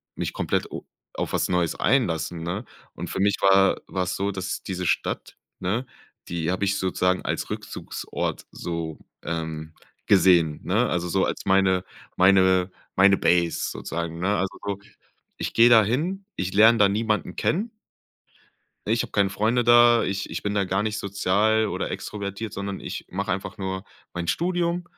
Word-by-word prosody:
mich - - -3
komplett - - -1
o - - -7 0.3
auf - - -3
was - - 0
Neues 90 -2 +1
einlassen, 85 - 0
ne? 95 +7 -3 0.3
Und - - -6
für - - -4
mich 100 0 +3
war 95 0 +4
war 95 -1 -1
es 90 0 -3
so, 100 +1 -1
dass 95 0 -4
diese 90 -1 -4
Stadt, - - -2 0.2
ne, 105 +8 -1 0.4
die 85 -1 -2
habe 95 +2 -2
ich 100 0 +1
sozusagen 95 0 0
als - - -3
Rückzugsort - - -5
so, 85 -2 -5 0.2
ähm, 80 -1 -4 0.3
gesehen, 85 -6 +4
ne? - - +1
Also 90 0 -1
so 95 +2 +2
als - - -3
meine 95 -1 +3 0.3
meine 95 -1 +4 0.2
meine 95 +1 +6
Base 85 -1 +1
sozusagen, 85 0 -5
ne? 100 +3 +1
Also 95 0 -2
so, 100 -1 -3 0.6
ich - - -4
gehe 115 +1 +6
da 110 -2 +7
hin, 165 - -1
ich 95 +1 -2
lerne 110 +3 +6
da 100 - +6
niemanden 105 -3 -1
kennen 210 +7 0 1.2
ne? 110 - +1
Ich 115 - +2
habe - - -9
keine 100 -2 +2
Freunde 110 +5 +1
da, 120 0 +6
ich 100 +1 -3
ich - - -4
bin 105 0 -2
da 100 -1 +2
gar 95 +2 0
nicht 110 0 -2
sozial 100 +3 +1
oder - - -3
extrovertiert, 100 +1 -5
sondern 100 0 -5
ich - - -6
mache 95 +1 -2
einfach 95 0 -4
nur 95 0 -4 0.3
mein 85 -1 -4
Studium, 175 0 0
95 Hz, 170 wpm, -24 LUFS, 90-105 Hz, 1.2 s, da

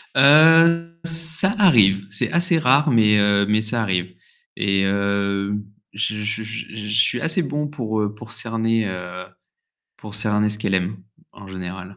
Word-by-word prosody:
Heu, 165 +4 +5
ça 165 +3 0
arrive, 100 - +4
c'est 100 +1 -3
assez 170 0 +2
rare 145 +2 +3
mais 105 -3 +4
heu, 100 0 +2
mais 105 +1 +1
ça 115 +1 -2
arrive 90 -3 -2 0.4
et 100 -1 0
heu, 100 0 -1 0.4
je 105 +1 -3
je 110 +1 -3
je 110 -1 -8
suis 125 - +1
assez 165 +2 -1
bon 150 0 -3
pour, 110 -7 -4
heu, 105 0 -3
pour 120 +2 -13
cerner, 115 -1 -1
heu, 90 -1 -7 0.7
pour 105 -2 -11
cerner 105 0 0
ce 105 0 -5
qu'elle 100 -2 -2
aime 95 +3 -2 0.4
en 100 - -14
général. 95 0 -9
110 Hz, 155 wpm, -20 LUFS, 100-145 Hz, 0.7 s, Heu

